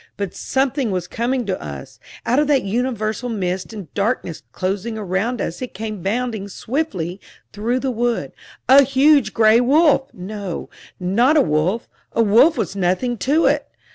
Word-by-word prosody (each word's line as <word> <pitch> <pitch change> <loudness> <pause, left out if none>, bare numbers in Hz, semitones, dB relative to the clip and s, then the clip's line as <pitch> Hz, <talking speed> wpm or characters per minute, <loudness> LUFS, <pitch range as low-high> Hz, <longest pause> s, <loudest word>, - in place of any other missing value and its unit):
But 200 -3 -3
something 265 -2 -1
was 180 -3 -2
coming 245 +3 -1
to 190 -2 -3
us 70 -2 -9 0.3
out 250 +4 +2
of 300 - +2
that 280 -3 +3
universal 230 +1 -2
mist 185 -3 -3
and 200 -9 -9
darkness 200 -6 -2
closing 200 +4 -3
around 210 +4 -2
us 170 - -4
it 250 - -6
came 215 -1 -5
bounding 220 +1 -2
swiftly 200 - -3 0.3
through 235 +5 -1
the 265 - -1
wood 240 0 -1 0.4
a 270 +2 +8
huge 275 -3 +4
gray 220 +1 +5
wolf! 280 +1 +3
No, 195 -1 -6 0.3
not 235 - +3
a - - +6
wolf 180 - 0 0.3
a 230 - +3
wolf 240 +10 +5
was 190 - -2
nothing 195 +7 0
to 295 - +2
it! - - +2
225 Hz, 160 wpm, -20 LUFS, 195-255 Hz, 0.4 s, a